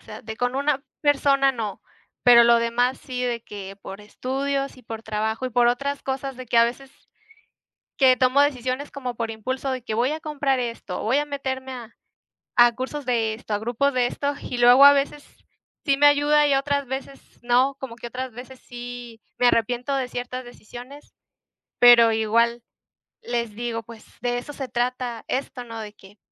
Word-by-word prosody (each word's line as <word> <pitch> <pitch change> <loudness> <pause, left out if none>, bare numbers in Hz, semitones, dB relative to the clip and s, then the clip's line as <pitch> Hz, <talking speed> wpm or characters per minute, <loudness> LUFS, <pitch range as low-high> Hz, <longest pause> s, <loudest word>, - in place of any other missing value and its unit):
sea, - - -10
de 220 -1 -7
con 245 0 -1
una 280 0 0 0.2
persona, 275 -2 +3
no, 220 -5 -5 0.4
pero 240 -1 +8
lo 235 0 +6
demás 240 +2 0
sí, 250 -1 -5
de 240 -1 -2
que 195 -2 -8
por 195 +1 -9
estudios 275 +6 -3
y 255 - -16
por 225 -1 -7
trabajo, 220 +2 -2
y - - -5
por 240 0 +3
otras 280 +4 -1
cosas 270 0 -4
de 255 - -9
que 235 - -1
a 230 - +7
veces 260 +3 -5 1.1
que 260 -2 +6
tomo 255 +2 +3
decisiones 260 0 -1
como 255 -3 -5
por 230 -1 -3
impulso, 260 +5 -3
de 255 -2 -4
que 220 - -4
voy 245 +5 +1
a 310 - -3
comprar 280 -3 -1
esto, 230 -6 -4
voy 230 +6 +1
a 295 - +1
meterme 265 -2 -4
a 235 -2 -9 0.7
a 240 -1 +6
cursos 265 +3 -5
de 225 -3 0
esto, 220 -1 -7
a - - +2
grupos 240 +6 0
de 250 -1 +2
esto, 285 +3 -2
y 250 - -5
luego 245 +3 +7
a 285 - +11
veces 285 +1 -1 0.6
sí 275 - +3
me 290 +1 +5
ayuda 290 +1 +4
y 285 -1 +3
otras 280 +1 0
veces 270 +1 -6 0.2
no. 250 +3 +2
Como 255 -3 -7
que 240 - -8
otras 255 +1 -6
veces 255 +2 -11
sí 245 -2 -9 0.2
me 245 - +4
arrepiento 245 +4 +1
de 260 -2 -2
ciertas 245 +1 -5
decisiones, 245 +4 -12 0.7
pero 235 -2 +8
igual 230 +2 +1 0.6
les 235 -3 -3
digo: 230 0 -4
"Pues, 225 0 -13 0.2
de 245 0 0
eso 290 +4 -8
se 270 -2 -5
trata 245 -1 -2
esto", 255 -1 -3
¿no?, 230 -1 -8
de 210 -1 -8
que 205 0 -18
250 Hz, 190 wpm, -23 LUFS, 235-275 Hz, 1.1 s, a